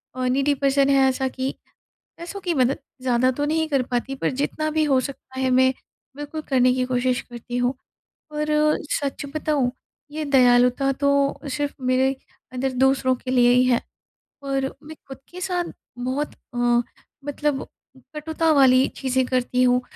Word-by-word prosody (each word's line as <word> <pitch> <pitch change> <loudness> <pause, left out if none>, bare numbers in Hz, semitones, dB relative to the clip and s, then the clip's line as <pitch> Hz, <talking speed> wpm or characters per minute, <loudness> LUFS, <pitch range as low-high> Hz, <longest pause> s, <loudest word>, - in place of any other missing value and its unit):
अ, 255 0 -2
needy 275 +3 +2
person 275 0 +2
है 270 -1 +5
ऐसा 265 0 -1
कि 260 +1 -3 0.7
पैसों 345 +4 -7
की 360 -3 -1
मदद, 260 -1 +2 0.2
ज़्यादा 255 0 +2
तो 290 +3 -2
नहीं 320 +1 +1
कर 275 -4 +1
पाती, 250 +2 -3
पर 270 - -1
जितना 295 +3 -2
भी 310 0 +1
हो 275 -3 +3
सकता 260 -1 -8
है 260 -1 +1
मैं 260 +1 +4 0.4
बिल्कुल 295 +2 -5
करने 255 -2 +4
की 255 0 0
कोशिश 250 0 0
करती 240 0 -8
हूँ 245 +1 +1 0.6
और 300 0 -2 0.5
सच 280 0 -2
बताऊँ 295 -5 0 0.4
ये 310 +1 -3
दयालुता 250 0 +4
तो 280 +1 +1 0.4
सिर्फ़ 290 0 -2
मेरे 260 +1 +2 0.4
अंदर 260 +1 -2
दूसरों 260 0 +2
के 255 - -7
लिए 245 -1 +5
ही 250 +1 +4
है 250 -2 +3 0.6
और 275 -1 -1 0.2
मैं 310 +1 -10
ख़ुद 270 - -8
के 365 +1 -9
साथ 355 -1 -2 0.3
बहुत 260 +4 -2 0.2
अ, - - -4 0.7
मतलब 290 -1 -2 0.5
कटुता 320 +1 0
वाली 260 -2 +5
चीज़ें 260 -1 0
करती 255 0 +1
हूँ। 250 0 +3
265 Hz, 160 wpm, -23 LUFS, 255-290 Hz, 0.7 s, है